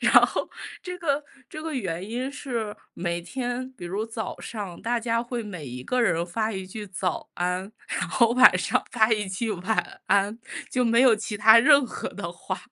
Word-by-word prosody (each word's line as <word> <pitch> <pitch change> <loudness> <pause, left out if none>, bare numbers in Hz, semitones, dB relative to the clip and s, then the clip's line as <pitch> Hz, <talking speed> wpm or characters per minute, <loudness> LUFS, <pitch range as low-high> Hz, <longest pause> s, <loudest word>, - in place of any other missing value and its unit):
然 - - +3
后 - - -3 0.3
这 360 -1 -5
个 295 -4 0 0.3
这 310 - -8
个 320 - -4
原 185 -5 -3
因 250 +4 -3
是， 235 -7 -4 0.2
每 175 0 -2
天 245 +6 -4
比 250 - -10
如 195 +5 -2
早 225 -1 -5
上 200 -6 -6
大 240 +1 +1
家 230 0 0
会 240 0 -4
每 180 -7 -7
一 125 0 -7
个 250 - 0
人 170 -8 +2
发 215 +5 -1
一 190 -2 -4
句 210 +3 -7
早 185 -2 -3
安， 180 +2 -2 0.2
然 - - -2
后 235 -2 +3
晚 250 -7 +8
上 255 +7 +1
发 225 -2 +4
一 210 -2 0
句 205 +5 -2
晚 195 +3 -2
安， 200 +3 +2 0.3
就 250 -1 +1
没 230 0 +4
有 255 -3 +7
其 210 0 -4
它 220 +2 +8
任 280 +3 +6
何 - - -5
的 - - -6
话。 - - -5
220 Hz, 210 characters per minute, -26 LUFS, 190-245 Hz, 0.3 s, 晚